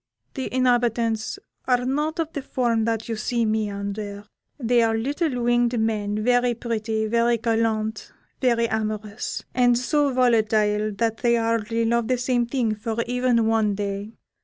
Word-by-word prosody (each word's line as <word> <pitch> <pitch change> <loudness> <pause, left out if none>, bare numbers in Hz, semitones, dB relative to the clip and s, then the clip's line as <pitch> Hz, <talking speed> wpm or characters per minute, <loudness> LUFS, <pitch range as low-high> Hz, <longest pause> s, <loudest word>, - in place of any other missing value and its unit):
The 265 -2 -4
inhabitants 240 - +1 0.3
are 250 -1 +2
not 300 +4 -1
of 325 -1 -2
the 285 - -3
form 235 -4 0
that 225 -1 -1
you 230 - -2
see 230 +2 -1
me 215 -1 0
under. 200 0 -5 0.3
They 240 -1 +3
are 225 -1 +2
little 275 +1 -1
winged 240 0 +2
men, 215 -1 -1
very 245 0 +2
pretty, 220 -2 -2
very 235 +2 +2
gallant, 225 -1 -1 0.3
very 235 -3 +2
amorous, 215 -1 -3
and 245 -1 +4
so 285 +3 +1
volatile 215 -4 +2
that 225 +2 -1
they 240 -1 +2
hardly 230 0 0
love 235 0 +1
the 255 0 +1
same 245 -1 0
thing 235 -3 0
for 220 +1 -4
even 245 -1 +1
one 220 -2 +2
day. 200 +1 -4
230 Hz, 155 wpm, -24 LUFS, 220-245 Hz, 0.3 s, and